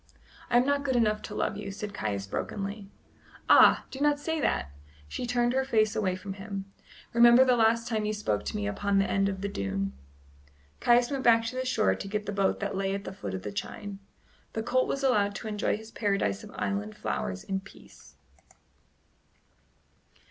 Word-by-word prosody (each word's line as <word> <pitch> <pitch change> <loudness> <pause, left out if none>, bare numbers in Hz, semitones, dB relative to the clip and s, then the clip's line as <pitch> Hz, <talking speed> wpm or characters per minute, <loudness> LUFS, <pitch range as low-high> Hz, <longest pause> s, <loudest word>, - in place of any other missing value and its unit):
"I 240 - +4
am 245 - +4
not 285 0 +1
good 265 -2 0
enough 215 -3 +2
to 210 - -7
love 210 - -1
you," 210 - -5
said 205 +1 -6
Caius 100 - -3
brokenly. 200 - -4 0.6
"Ah! - - +7
do 265 - -7
not 295 0 +2
say 320 +1 -2
that" 70 - 0 0.4
she 245 - -4
turned 240 0 +1
her 265 +1 +2
face 215 -5 +2
away 190 -4 0
from 195 +1 -6
him 195 0 -6 0.5
"remember 235 +2 +7
the 250 -1 +4
last 230 0 +3
time 220 -2 -1
you 210 - 0
spoke 205 - -1
to - - -4
me 100 - -2
upon 200 - 0
the 195 - +4
end 195 0 +1
of 190 -1 -5
the 200 - -1
dune." 100 - -3 0.9
Caius 240 +1 +4
went 275 -1 -1
back 230 -1 +5
to 230 - -4
the 255 0 -2
shore 95 - +2
to 95 - -6
get 210 +1 -3
the 205 - -3
boat 195 -1 +1
that 200 -1 -2
lay 195 0 -1
at 200 - -5
the - - -7
foot 100 - -5
of 95 - -6
the 105 - -4
chine. 195 - -6 0.5
The 220 - -2
colt 255 +2 +1
was 275 - -2
allowed 205 -6 +2
to 220 - -6
enjoy 210 -1 0
his 220 +1 -12
paradise 195 - 0
of - - -10
island 100 +2 -3
flowers 95 0 -3
in 195 -1 -2
peace. 195 - -16
205 Hz, 200 wpm, -28 LUFS, 195-240 Hz, 0.9 s, Ah